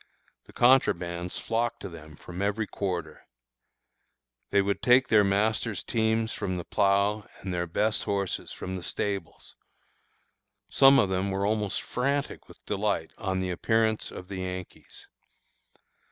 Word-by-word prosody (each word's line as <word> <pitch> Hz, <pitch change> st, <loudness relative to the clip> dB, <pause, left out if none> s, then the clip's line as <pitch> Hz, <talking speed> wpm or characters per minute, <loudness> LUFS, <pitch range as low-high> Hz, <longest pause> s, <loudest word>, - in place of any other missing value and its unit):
The -, -, -16 dB
contrabands 90 Hz, -9 st, +2 dB
flocked 115 Hz, +1 st, -1 dB
to -, -, -5 dB
them 80 Hz, -4 st, -11 dB
from 90 Hz, +5 st, -8 dB
every 105 Hz, +2 st, 0 dB
quarter. 95 Hz, -3 st, -4 dB, 1.2 s
They 100 Hz, -, +3 dB
would 100 Hz, 0 st, 0 dB
take 125 Hz, +1 st, +5 dB
their 105 Hz, -2 st, +6 dB
masters' 105 Hz, +2 st, 0 dB
teams 110 Hz, 0 st, 0 dB
from 95 Hz, -3 st, -3 dB
the 85 Hz, -, -4 dB
plough 100 Hz, +3 st, +1 dB
and 95 Hz, -, -4 dB
their 90 Hz, 0 st, -1 dB
best 105 Hz, +5 st, 0 dB
horses 100 Hz, -2 st, -2 dB
from 95 Hz, -, -5 dB
the 90 Hz, -, -5 dB
stables. 100 Hz, -1 st, -4 dB, 1.1 s
Some 135 Hz, +7 st, +7 dB
of 100 Hz, -, +3 dB
them 95 Hz, +1 st, 0 dB
were 95 Hz, +1 st, -1 dB
almost 105 Hz, -1 st, -1 dB
frantic 140 Hz, +3 st, -2 dB
with -, -, -17 dB
delight 100 Hz, -5 st, -1 dB
on 95 Hz, -3 st, -1 dB
the 90 Hz, -1 st, -2 dB
appearance 110 Hz, +4 st, +1 dB
of 90 Hz, -, -9 dB
the 95 Hz, -, -6 dB
Yankees. 90 Hz, -1 st, -7 dB
100 Hz, 140 wpm, -28 LUFS, 95-110 Hz, 1.2 s, Some